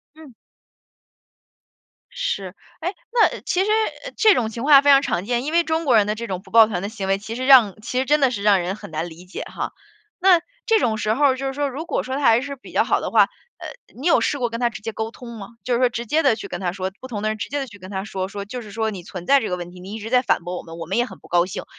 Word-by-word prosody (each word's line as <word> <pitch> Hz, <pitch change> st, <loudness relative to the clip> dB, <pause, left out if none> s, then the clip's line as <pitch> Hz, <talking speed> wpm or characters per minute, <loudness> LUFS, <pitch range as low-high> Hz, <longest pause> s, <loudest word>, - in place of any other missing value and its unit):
嗯。 310 Hz, -6 st, -14 dB, 1.8 s
是。 200 Hz, -, -3 dB, 0.3 s
哎， 360 Hz, +4 st, -3 dB, 0.2 s
那 470 Hz, -2 st, +3 dB
其 370 Hz, +1 st, 0 dB
实， 425 Hz, -, -1 dB, 0.3 s
呃， -, -, -7 dB
这 430 Hz, -2 st, +6 dB
种 225 Hz, -3 st, 0 dB
情 230 Hz, +2 st, -6 dB
况 280 Hz, -1 st, +7 dB
非 285 Hz, -, +4 dB
常 275 Hz, 0 st, +7 dB
常 180 Hz, -9 st, -1 dB
见， 240 Hz, +2 st, -1 dB
因 305 Hz, -, -3 dB
为 340 Hz, 0 st, +3 dB
中 320 Hz, 0 st, -1 dB
国 250 Hz, -5 st, +4 dB
人 205 Hz, -1 st, +4 dB
的 210 Hz, -, 0 dB
这 230 Hz, +2 st, -6 dB
种 185 Hz, -4 st, -4 dB
不 -, -, -18 dB
抱 225 Hz, -1 st, +7 dB
团 195 Hz, -4 st, -3 dB
的 200 Hz, -, -3 dB
行 200 Hz, -3 st, -5 dB
为 195 Hz, -, +2 dB
其 220 Hz, +3 st, -7 dB
实 255 Hz, +2 st, -3 dB
让 245 Hz, -8 st, +7 dB
其 250 Hz, +2 st, -3 dB
实 260 Hz, -, +1 dB
真 295 Hz, +3 st, +3 dB
的 270 Hz, -, +4 dB
是 210 Hz, -5 st, -4 dB
让 200 Hz, -3 st, +4 dB
人 180 Hz, +3 st, -3 dB
很 215 Hz, -, -11 dB
难 160 Hz, +2 st, -3 dB
理 170 Hz, +2 st, -13 dB
解 180 Hz, -, -7 dB
哈。 -, -, -5 dB, 0.5 s
那 365 Hz, -2 st, +6 dB, 0.3 s
这 445 Hz, -2 st, +4 dB
种 220 Hz, -2 st, 0 dB
时 215 Hz, 0 st, 0 dB
候 285 Hz, +3 st, +3 dB
儿， 260 Hz, -2 st, +3 dB
就 270 Hz, +1 st, -4 dB
是 270 Hz, -, -2 dB
说 285 Hz, +1 st, -1 dB
如 285 Hz, +5 st, -6 dB
果 -, -, -1 dB
说 260 Hz, +1 st, -4 dB
他 285 Hz, -, -3 dB
还 230 Hz, -2 st, +5 dB
是 280 Hz, +1 st, -6 dB
比 260 Hz, -, -14 dB
较 -, -, +3 dB
好 -, -, +1 dB
的 -, -, -4 dB
话， -, -, +6 dB, 0.3 s
呃， -, -, -8 dB, 0.3 s
你 275 Hz, +7 st, -7 dB
有 345 Hz, -, +5 dB
试 290 Hz, -, 0 dB
过 240 Hz, -3 st, -1 dB
跟 230 Hz, -, -4 dB
他 240 Hz, -, +2 dB
直 215 Hz, -, -10 dB
接 225 Hz, -, -4 dB
沟 220 Hz, +1 st, -4 dB
通 235 Hz, -2 st, -10 dB
吗？ 195 Hz, -2 st, -8 dB, 0.2 s
就 250 Hz, -, 0 dB
是 235 Hz, -, 0 dB
说 255 Hz, -, +5 dB
直 235 Hz, -1 st, -5 dB
接 315 Hz, +7 st, +2 dB
地 265 Hz, -5 st, +4 dB
去 210 Hz, -3 st, -8 dB
跟 175 Hz, -, -5 dB
他 180 Hz, -2 st, -1 dB
说， 190 Hz, -1 st, -3 dB
不 260 Hz, -, -8 dB
同 210 Hz, -4 st, -5 dB
的 215 Hz, -, 0 dB
人 215 Hz, 0 st, -3 dB
直 -, -, -4 dB
接 285 Hz, +1 st, -2 dB
地 270 Hz, -, -3 dB
去 225 Hz, -5 st, -14 dB
跟 185 Hz, 0 st, -11 dB
他 190 Hz, -1 st, -3 dB
说， 190 Hz, -3 st, -4 dB
说 200 Hz, 0 st, -6 dB
就 245 Hz, +4 st, -6 dB
是 210 Hz, -2 st, -11 dB
说： 220 Hz, 0 st, -1 dB
“你 195 Hz, -4 st, -7 dB
存 180 Hz, -1 st, -8 dB
在 280 Hz, -, +6 dB
这 225 Hz, -, -3 dB
个 180 Hz, -, -2 dB
问 175 Hz, 0 st, -7 dB
题， 180 Hz, -, -13 dB
你 190 Hz, +3 st, -9 dB
一 225 Hz, -, -6 dB
直 225 Hz, +2 st, -7 dB
在 250 Hz, 0 st, +4 dB
反 -, -, +1 dB
驳 180 Hz, +1 st, -5 dB
我 -, -, -8 dB
们， 165 Hz, 0 st, -11 dB
我 165 Hz, -, -6 dB
们 190 Hz, -, -2 dB
也 240 Hz, -, +3 dB
很 -, -, -12 dB
不 -, -, -18 dB
高 175 Hz, 0 st, +3 dB
兴， 185 Hz, -, -6 dB
230 Hz, 340 characters per minute, -22 LUFS, 195-275 Hz, 1.8 s, 况